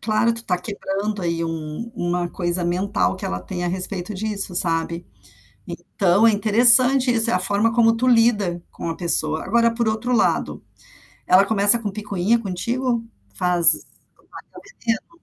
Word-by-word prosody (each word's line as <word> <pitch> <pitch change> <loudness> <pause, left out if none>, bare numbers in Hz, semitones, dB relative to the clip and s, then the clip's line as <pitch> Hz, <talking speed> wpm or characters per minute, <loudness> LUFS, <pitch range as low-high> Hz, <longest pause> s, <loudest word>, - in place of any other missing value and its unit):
Claro, 225 +1 0
tu 230 0 -7
tá 180 -4 -1
quebrando 200 +1 -5
aí 170 -1 -2
um 165 +7 -6
um 175 - -4
uma 175 0 -2
coisa 175 -1 -3
mental 175 - -1
que - - -9
ela 90 0 -4
tem 175 - -6
a - - -1
respeito 185 +2 -4
disso, 200 -2 -4
sabe. 170 0 -1 0.6
Então, 195 +3 0
é 225 - +5
interessante 245 +5 +5
isso, 230 -1 +2
é - - 0
a - - +2
forma 205 +4 +1
como 225 -1 +3
tu 255 +2 -2
lida 210 -8 +2
com - - -7
a 165 - -4
pessoa. 155 -2 -1
Agora 235 +3 +1
por 235 -2 -1
outro 220 +3 -2
lado, 225 - -1 0.7
ela 190 +2 +5
começa 205 +1 +5
com 210 -3 -5
picuinha 205 +2 -1
contigo? 235 +4 -3 0.3
Faz 175 -2 +4
larga - - -11 0.8
veneno? 230 -1 -2
200 Hz, 165 wpm, -21 LUFS, 175-230 Hz, 0.8 s, é